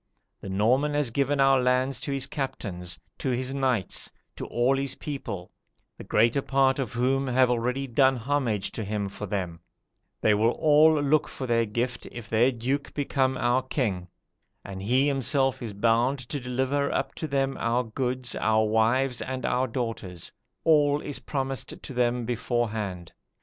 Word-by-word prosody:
The 100 - -8
Norman 125 +10 +2
has 145 -5 +1
given 140 +3 +1
our 135 -1 +5
lands 125 0 +1
to 140 - -4
his 135 -1 -2
captains, 95 - -5 0.2
to 135 - -2
his 130 +1 -1
knights, 130 -8 -1 0.2
to - - -6
all 125 +3 +2
his 135 0 -2
people, 100 -11 -6 0.4
the - - -10
greater 115 +5 +2
part 135 0 +2
of 130 -2 -3
whom 130 +3 +1
have 130 0 +3
already 125 +3 0
done 135 +1 +3
homage 120 -5 -1
to 110 - -4
him 100 -1 -2
for 100 +1 -7
them; 90 -4 -3 0.6
they 110 - +3
will 110 +3 +3
all 155 0 +5
look 145 +1 +2
for 130 - -6
their 115 -2 +2
gift, 120 +4 -3
if 120 -3 -8
their 115 +4 +3
Duke 130 +4 -3
become 135 -2 0
our 120 +2 +2
king; 110 -9 -2 0.6
and 95 -1 -7
he 125 +7 +2
himself 135 -1 +1
is 115 -3 -4
bound 115 +6 +2
to 145 - -2
deliver 130 +3 -1
up 135 0 -1
to 160 - -4
them 135 -1 0
our 120 +2 +1
goods, 125 +2 -3
our 110 0 +2
wives, 120 +4 +2
and 130 0 -4
our 130 +1 +1
daughters: 110 -8 -5 0.3
all 145 -2 +4
is 145 -1 -5
promised 135 -2 -3
to - - -8
them 120 -1 +1
beforehand. 110 -7 -2
125 Hz, 165 wpm, -27 LUFS, 115-135 Hz, 0.6 s, our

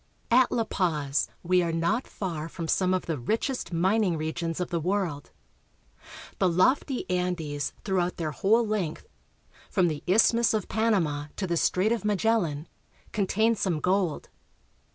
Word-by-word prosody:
AT 250 +1 +5
La 230 - +1
Paz 155 -9 0 0.2
we 180 +1 +3
are 170 -1 -1
not 170 +10 0
far 165 -5 -5
from 165 0 -6
some 185 +2 +2
of 185 -1 0
the 160 -4 -2
richest 225 - -2
min 190 +6 +2
l\ - - +2
ing - - -2
regions 165 +2 -3
of 180 0 -3
the 170 - 0
world. 175 -4 -2 1.1
The 185 - +3
lofty 255 - +1
Andes 175 -6 -2
through 190 -2 +1
out 175 0 -1
their 160 -3 -2
whole 225 +9 +2
length, 205 -7 -2 0.6
from 180 -4 +2
the 150 -2 -4
Isthmus 225 +4 +4
of 210 - -2
Panama 175 -10 0
to 195 - -2
the 170 -2 -1
Strait 185 +5 +2
of 235 -2 0
Magellan, 200 -7 0 0.4
contain 215 +3 +2
some 185 -7 -1
gold. 180 -1 0
180 Hz, 160 wpm, -27 LUFS, 165-215 Hz, 1.1 s, AT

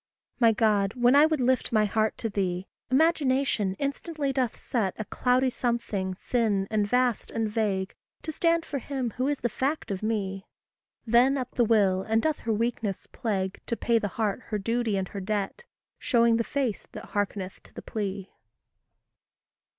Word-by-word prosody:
My 230 -2 +6
God, 210 -3 +2
when 245 +1 +4
I 295 +2 +7
would 315 -2 0
lift 255 0 +1
my 215 -2 +4
heart 215 +1 0
to 225 - -2
thee, 185 -2 -1 0.2
Imagination 265 - +2
instantly 280 0 -2
doth 255 -4 -1
set 210 -7 -1
A 215 - -4
cloudy 255 +3 +1
something, 215 -7 -2
thin, 205 -3 0
and 210 -2 +1
vast, 250 0 +1
and 225 -1 -1
vague, 205 -3 -1 0.3
To 315 - -3
stand 335 +1 +1
for 280 - -3
him 260 -2 -3
who 255 +1 +1
is 290 -1 -1
the - - +2
fact 270 +3 -2
of 190 - -3
me; 195 -3 -2 0.6
Then 245 +4 +4
up 255 -1 -4
the 245 - +2
Will, 205 -5 +3
and 220 +3 +1
doth 310 +5 0
her 225 - -2
weakness 220 -3 -1
plague 190 -4 -3
To 235 - -1
pay 235 -1 +2
the 205 - -1
heart 220 +1 0
her 215 - -1
duty 230 0 0
and 190 -1 -2
her 200 - -6
debt, 205 - -3 0.3
Showing 235 -2 +3
the 230 - +1
face 260 -4 -2
that - - -9
hearkeneth 200 -2 -3
to - - -18
the - - -9
plea. 200 -3 -4
225 Hz, 175 wpm, -27 LUFS, 200-255 Hz, 0.6 s, I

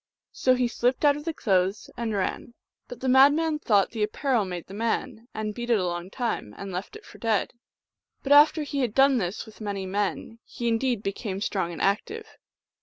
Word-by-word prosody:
So 255 0 +2
he 250 -1 +1
slipped 245 +4 0
out 285 -1 +5
of 295 +1 -8
the 330 - 0
clothes 190 -5 0
and 230 -3 -3
ran; 200 +4 -3 0.3
but 245 - -10
the 260 - -2
madman 290 +4 +5
thought 205 -8 +2
the 225 - -5
apparel 230 +1 0
made 180 -2 -6
the 190 - -12
man, 230 +2 -2
and 215 -1 -4
beat 240 +2 -6
it 235 - +4
a 185 - -1
long 175 +1 -4
time, 225 - -3
and 200 -1 -7
left 180 +2 -5
it - - -12
for - - -14
dead. 220 -3 0 0.7
But 275 - -3
after 300 +2 +6
he 285 -1 -3
had 240 -5 -1
done 270 -1 +5
this 185 +3 -3
with 220 0 -15
many 200 -2 -3
men 205 +3 -3
he 235 - -5
indeed 230 -1 0
became 195 0 -4
strong 190 -4 -2
and 170 - -5
active. 415 - -2
225 Hz, 205 wpm, -26 LUFS, 200-260 Hz, 0.7 s, after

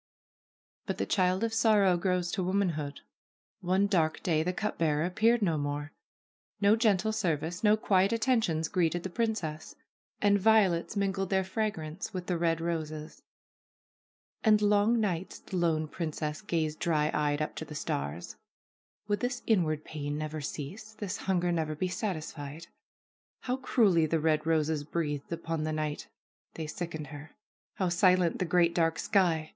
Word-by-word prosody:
But - - -2
the - - -1
child 185 +1 +1
of 225 -1 0
sorrow 215 -5 +4
grows 180 -1 0
to 195 - -1
womanhood. 175 -6 -1 0.6
One 190 +1 +2
dark 165 -6 +1
day 160 -3 +2
the 180 +3 0
cup 210 +3 -3
bearer 155 -1 +2
appeared 220 +5 +2
no 165 -5 +1
more. 145 +1 -3 0.7
No 205 +1 +5
gentle 220 -2 +2
service, 175 -4 -2
no 210 0 +5
quiet 195 -2 +2
attentions 225 -9 +1
greeted 175 -1 0
the 190 - -5
princess. 180 -9 -2 0.4
And 205 0 +3
violets 200 -4 +3
mingled 195 -1 0
their 190 -1 +2
fragrance 190 -1 -3
with 180 -1 -4
the 180 - -1
red 165 -1 +1
roses. 155 -2 -4 1.2
And 215 -2 +5
long 210 +3 +3
nights 185 -4 -2
the 185 - -6
lone 160 -3 +1
princess 155 -2 -4
gazed 155 -2 -2
dry 155 -3 +1
eyed 145 -1 +1
up 155 - -2
to 160 - -4
the 150 - -9
stars. 70 - -4 0.7
Would 205 -1 0
this 245 +2 -2
inward 155 -8 +1
pain 145 -1 -4
never 155 0 -4
cease, 175 +10 -6
this 205 -2 -4
hunger 180 -2 0
never 160 -2 -1
be 185 +4 -1
satisfied? 160 -5 -5 0.8
How 250 +1 -1
cruelly 200 -11 +3
the 165 +1 +1
red 155 0 +1
roses 155 -2 +1
breathed 145 -2 -3
upon 165 -1 -3
the 155 - -1
night! 155 -1 -3 0.5
They 160 - -4
sickened 155 0 -5
her. 145 +2 -10 0.4
How 185 -2 0
silent 180 -1 +3
the 185 - +1
great, 170 0 +3
dark 165 -1 +1
sky 170 -6 +1
175 Hz, 155 wpm, -30 LUFS, 155-200 Hz, 1.2 s, No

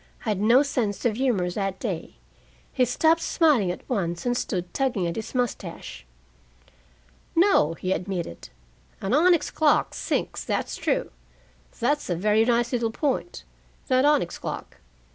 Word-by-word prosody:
I - - -1
had 205 -2 0
no 235 +6 +5
sense 245 -9 -2
of 225 -3 +2
humor 220 -9 +1
that 195 0 -3
day. 190 -9 -4 0.6
He 255 - +3
stopped 320 +7 +2
smiling 290 - +3
at 180 - -6
once, 175 -8 -2
and 245 0 +1
stood 180 -7 -3
tugging 255 -9 0
at 170 - -2
his 220 +3 -6
mustache. 195 - -4 1.3
"No," 330 - +4
he 185 +3 -3
admitted. 180 - -4 0.5
"An 195 +4 -2
onyx 340 +3 +4
clock 305 -2 +2
sinks, - - -2
that's - - -2
true. - - -1 0.7
That's 290 +2 0
a 175 - +1
very 210 +5 +3
nice 240 +1 +1
little 235 -2 +1
point, 285 +8 -2 0.5
that 255 0 +4
onyx 290 - +2
clock. - - -6
230 Hz, 145 wpm, -25 LUFS, 185-270 Hz, 1.3 s, no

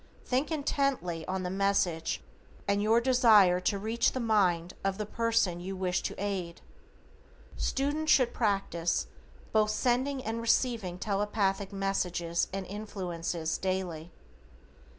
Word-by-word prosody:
THINK 260 +6 0
INTENTLY 275 - -1
on 185 0 -2
the 180 - -3
message 190 -4 0 0.4
and 200 0 +2
your 220 +2 +4
desire 225 -8 +5
to 190 +2 0
reach 220 +4 +1
the 260 - -2
mind 185 -7 +2
of 195 0 0
the 210 - -3
person 225 -5 +1
you 190 +2 -5
wish 180 -1 -1
to - - -4
aid. 190 -4 -3 1.0
Students 295 +3 0
should 255 -3 +4
practice 195 -6 0 0.5
both 215 -1 +3
sending 255 +5 0
and 225 +1 -2
receiving 230 -6 +1
Telepathic 200 0 -1
messages 180 -4 -1
and 195 0 -4
influences 180 -5 -4
daily. 180 -3 -3
200 Hz, 125 wpm, -30 LUFS, 180-230 Hz, 1.0 s, desire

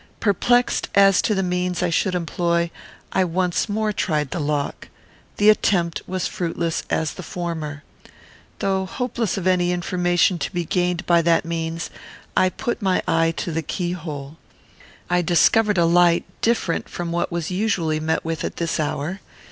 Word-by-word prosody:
Perplexed 245 +4 +2
as 195 -1 +6
to 215 - +1
the 190 - +1
means 180 0 -1
I 175 - +1
should 180 +2 +1
employ, 170 -1 0 0.4
I 190 - +2
once 180 +3 0
more 215 0 0
tried 150 -8 -1
the - - -2
lock. 145 -1 -2 0.5
The 210 +1 +7
attempt 175 -5 +1
was 185 -1 -2
fruitless 165 -1 -2
as 160 - 0
the - - -8
former. 160 -4 -5 0.7
Though 190 -1 0
hopeless 235 -2 -2
of 190 - -3
any 180 -1 +3
information 175 0 +1
to - - -3
be 175 -2 -2
gained 180 +1 0
by 170 -1 +4
that 165 +1 +2
means, 165 0 -3 0.4
I 185 - +4
put 240 +5 -3
my 190 -2 +1
eye 165 0 +3
to 170 - -3
the 165 +1 -1
keyhole. 160 -4 -5 0.7
I 180 0 +2
discovered 205 +5 +3
a 170 - +4
light 170 0 +4 0.2
different 225 -7 0
from 175 -1 -4
what 170 +1 -1
was 170 0 -3
usually 180 -6 0
met 160 +1 -1
with 165 -1 -3
at - - -3
this 165 -1 -2
hour. 155 +4 -2
175 Hz, 165 wpm, -22 LUFS, 165-185 Hz, 0.7 s, The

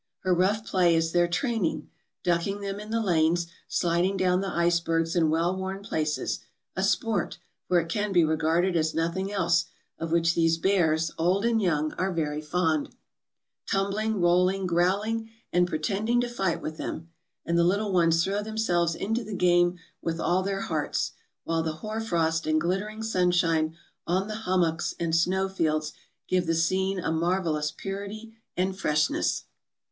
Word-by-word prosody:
Her 185 -1 +2
rough 200 +5 +1
play 180 -5 +3
is 165 0 +1
their 175 0 +3
training: 220 - -1 0.3
ducking 180 +3 0
them 200 0 -4
in 210 +1 -9
the 225 0 0
lanes, 170 -2 +2 0.2
sliding 175 +3 +1
down 185 0 +2
the 195 - -2
icebergs 170 -1 +1
in 165 -3 +3
well 165 +3 +1
worn 190 +1 -4
places 155 -5 -1 0.2
— - - -55
a - - -1
sport, 220 -8 0 0.3
for 180 - +4
it 165 - -3
can 205 +4 -1
be 175 -3 +5
regarded 160 +3 +1
as 160 -1 +1
nothing 170 +4 -1
else, 195 -4 +2 0.3
of 165 -1 -4
which 165 0 +3
these 165 -1 +2
bears, 165 -3 +2
old 185 +6 +2
and 230 -1 +2
young, 155 -5 0
are 190 +1 0
very 155 -3 -2
fond 160 -1 0 0.4
— - - -59
"tumbling, 200 +2 0
rolling, 180 +2 +3
growling, 200 +6 +1 0.2
and 175 0 +4
pretending 200 +9 0
to 245 - -1
fight 195 -8 -2
with 155 0 -5
them; 165 +1 -5 0.4
and 170 - 0
the 170 - +4
little 200 +3 +1
ones 165 -2 +4
throw 200 +3 -1
themselves 190 -6 0
into 225 +6 -2
the 210 -1 -6
game 175 0 +3 0.2
with 165 0 -2
all 180 +3 +2
their 195 +1 -2
hearts; 155 -5 -1 0.3
while 165 0 0
the 160 -1 -2
hoarfrost 170 -5 -1
and 155 0 +3
glittering 200 +6 -2
sunshine 175 -6 +1 0.3
on 185 +3 +1
the 215 - -4 0.2
hummocks 170 -3 +1
and 165 -1 0
snow 185 +3 +2
fields 155 -5 -1 0.3
give 180 -2 +1
the 165 - +2
scene 190 +3 +1
a 170 - -1
marvelous 165 -2 0
purity 200 +5 -6 0.2
and 185 +1 0
freshness." 150 -3 +1
175 Hz, 165 wpm, -27 LUFS, 165-195 Hz, 0.4 s, be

